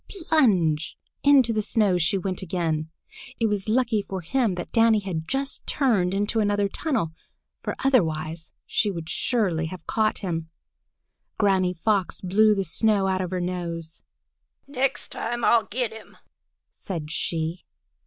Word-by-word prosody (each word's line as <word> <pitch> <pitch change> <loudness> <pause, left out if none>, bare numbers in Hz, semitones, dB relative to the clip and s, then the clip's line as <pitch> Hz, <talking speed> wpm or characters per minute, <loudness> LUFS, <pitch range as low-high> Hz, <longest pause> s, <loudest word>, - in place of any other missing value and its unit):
Plunge! 200 - +1 0.3
Into 270 -5 +5
the 215 - +1
snow 205 -4 +2
she 175 +4 +2
went 185 0 -3
again. 160 -4 -2 0.5
It 230 - +2
was 210 -1 -1
lucky 230 -2 +2
for 190 -2 -5
him 215 +3 0
that 175 - -6
Danny 225 -1 +5
had 165 -5 -4
just 270 0 -2
turned 215 -11 +2
into 205 +3 0
another 205 -1 +2
tunnel, 220 - -1 0.5
for - - -3
otherwise 160 - +1
she 210 - +1
would 165 -4 -5
surely 185 -10 0
have 180 0 -9
caught 215 -1 +1
him. 165 -4 -3 0.9
Granny 190 -3 +2
Fox 195 +1 0
blew 210 +3 +4
the 195 - 0
snow 200 +3 +2
out 190 -1 +1
of 180 - -3
her 185 0 -2
nose. 170 -2 -4 0.6
"Next 270 -1 -2
time 240 0 -3
I'll 230 -2 +4
get 240 0 -2
him!" 220 -1 -13 0.5
said 160 -5 -6
she. 165 0 -2
195 Hz, 145 wpm, -25 LUFS, 170-225 Hz, 0.9 s, Into